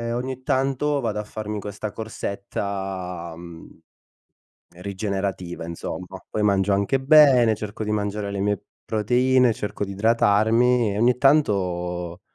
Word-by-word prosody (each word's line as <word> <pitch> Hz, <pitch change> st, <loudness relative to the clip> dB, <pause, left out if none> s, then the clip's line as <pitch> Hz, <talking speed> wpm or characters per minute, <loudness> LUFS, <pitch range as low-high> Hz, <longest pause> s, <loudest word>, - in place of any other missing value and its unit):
E 115 Hz, 0 st, -3 dB
ogni 130 Hz, +1 st, -4 dB
tanto 135 Hz, +2 st, 0 dB
vado 110 Hz, -4 st, -2 dB
a 105 Hz, -, -3 dB
farmi 105 Hz, 0 st, -5 dB
questa 105 Hz, +1 st, -6 dB
corsetta, 95 Hz, -5 st, -5 dB
mhmm, 85 Hz, -1 st, -12 dB, 1.0 s
rigenerativa, 95 Hz, -3 st, -4 dB
insomma, 90 Hz, +2 st, -7 dB
poi 105 Hz, -, -2 dB
mangio 100 Hz, -1 st, +2 dB
anche 100 Hz, +7 st, +1 dB
bene, 135 Hz, -6 st, +6 dB
cerco 105 Hz, +1 st, -6 dB
di 105 Hz, -, -2 dB
mangiare 105 Hz, -1 st, -2 dB
le 100 Hz, -, -4 dB
mie 100 Hz, -1 st, -1 dB, 0.2 s
proteine, 125 Hz, +3 st, +3 dB
cerco 105 Hz, -1 st, -4 dB
di 100 Hz, -, -4 dB
idratarmi 110 Hz, +2 st, +3 dB
e -, -, -3 dB
ogni 120 Hz, +2 st, +3 dB
tanto, 90 Hz, -, +1 dB
105 Hz, 130 wpm, -23 LUFS, 95-120 Hz, 1.0 s, bene